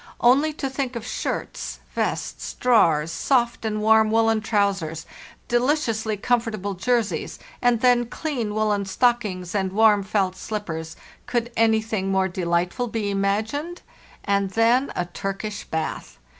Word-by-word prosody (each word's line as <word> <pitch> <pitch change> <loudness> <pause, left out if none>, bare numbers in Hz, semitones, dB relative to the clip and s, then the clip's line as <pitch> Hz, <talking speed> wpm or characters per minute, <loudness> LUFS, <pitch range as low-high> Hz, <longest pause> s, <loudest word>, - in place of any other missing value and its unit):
Only 275 +6 +4
to 285 -2 -3
think 265 -1 -3
of 230 -2 -5
shirts, - - -4
vests, - - -3
drawers, 165 -11 +3
soft 240 +5 +1
and 215 -1 -2
warm 220 0 +5
woollen 225 0 +3
trousers, 195 -7 0 0.4
delicious 240 -3 +1
ly 215 - 0
comfortable 215 -2 -1
jerseys, 230 +3 -1 0.2
and 240 -2 +3
then 245 -1 +4
clean 240 -7 -3
woollen 210 -2 +1
stockings 195 -4 0
and 190 -2 0
warm 210 0 +5
felt 195 -2 0
slippers—could 210 +5 -5
anything 220 -3 +1
more 190 0 +2
delightful 180 +6 -1
be 220 -3 -2
imagined? 220 - -1 0.4
And 200 -1 +1
then 230 +6 +2
a 180 - -1
Turkish 195 +4 -5
bath! 160 - -4
215 Hz, 130 wpm, -23 LUFS, 195-240 Hz, 0.4 s, warm